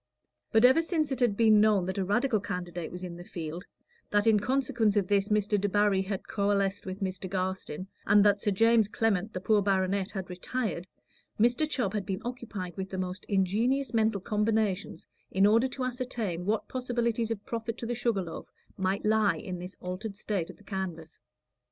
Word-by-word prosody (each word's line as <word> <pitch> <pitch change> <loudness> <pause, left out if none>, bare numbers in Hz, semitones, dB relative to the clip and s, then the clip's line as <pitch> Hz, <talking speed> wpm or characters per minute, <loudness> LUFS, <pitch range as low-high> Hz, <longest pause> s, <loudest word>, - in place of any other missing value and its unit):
But 220 +2 +6
ever 260 +6 +6
since 320 -3 -1
it 265 - -2
had 235 -5 +2
been 220 -2 +6
known 210 -4 +4
that 190 +2 -3
a - - +1
Radical 220 +4 +1
candidate 180 -4 -5
was 180 +1 -7
in 175 -1 -6
the 175 - -9
field, 170 0 -6 0.4
that 205 +1 +2
in 220 -2 +5
consequence 240 -2 +1
of 200 -3 +2
this 200 0 +2
Mr. 210 -1 +2
Debarry 205 -1 +2
had 190 0 -4
coalesced 200 -1 0
with 190 +2 -5
Mr. 185 -1 -3
Garstin, 185 -2 -3 0.2
and 205 0 +6
that 205 -1 +4
Sir - - +1
James 225 +2 +4
Clement, 210 -2 0
the 185 - -3
poor 210 +2 +3
baronet, 195 0 +1
had 190 -3 -6
retired, 185 -1 -3 0.5
Mr. 245 +7 +3
Chubb 245 -9 -1
had 205 -3 -3
been 195 +2 -3
occupied 220 -8 -5
with 190 0 -4
the 190 - -5
most 185 0 -4
ingenious 220 +7 +1
mental 220 -3 +2
combinations 210 -1 0 0.2
in 195 +1 +3
order 225 +5 +4
to 260 0 -5
ascertain 235 -8 -3
what 215 +1 0
possibilities 235 -3 -1
of 215 -3 -4
profit 230 0 -4
to 235 - -5
the 240 - -2
Sugar 235 -5 0
Loaf 165 -2 -8 0.3
might 190 +2 -1
lie 210 -5 +3
in 180 +2 -6
this 180 +2 -8
altered 195 +3 -5
state 200 -5 -2
of - - -11
the - - -19
canvass. 180 -5 -5
205 Hz, 190 wpm, -29 LUFS, 190-225 Hz, 0.5 s, But